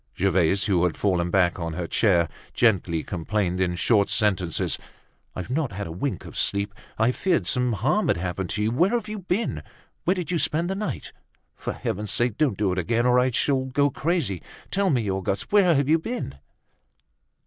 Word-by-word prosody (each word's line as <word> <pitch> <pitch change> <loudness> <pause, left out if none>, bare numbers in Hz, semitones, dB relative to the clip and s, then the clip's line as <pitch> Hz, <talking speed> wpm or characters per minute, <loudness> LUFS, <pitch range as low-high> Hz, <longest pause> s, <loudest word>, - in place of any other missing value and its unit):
Gervaise, 95 0 +2
who 90 -5 +2
had 90 - -1
fallen 90 -4 +1
back 90 -1 +2
on 85 -1 -3
her 90 +1 -3
chair, 85 -2 +3 0.3
gently 90 -8 +2
complained, 95 0 -1
in 90 -1 +1
short 100 +3 +3
sentences: 100 -7 0 0.6
"I've 90 +6 -5
not 140 -3 -1
had 100 +2 -4
a 80 - -6
wink 95 - -3
of - - -10
sleep. 100 0 0 0.2
I 110 +3 +3
feared 170 - 0
some 125 +5 0
harm 135 - +1
had 130 - +2
happened 90 +1 -3
to 105 - -1
you. 110 - +1
Where 170 +11 +3
have 230 -3 -1
you 215 0 -5
been? 190 +4 -2 0.4
Where 185 - +3
did 180 -1 -4
you 170 - +1
spend 160 +4 0
the - - -1
night? 210 +1 -4 0.4
For - - -4
heaven's 105 +2 -3
sake! 120 -1 +1
Don't 140 -10 +2
do 100 -3 +1
it 90 - -1
again, 115 +6 +1
or 125 0 +5
I 125 +1 +3
shall 130 +2 +1
go 140 +2 +1
crazy. 130 - -1 0.3
Tell 195 -1 +2
me 120 - +1
Auguste, 95 +1 -2
where 190 -5 +5
have 140 -1 +2
you 160 +2 +4
been?" 230 - -5
110 Hz, 195 wpm, -25 LUFS, 95-150 Hz, 0.6 s, or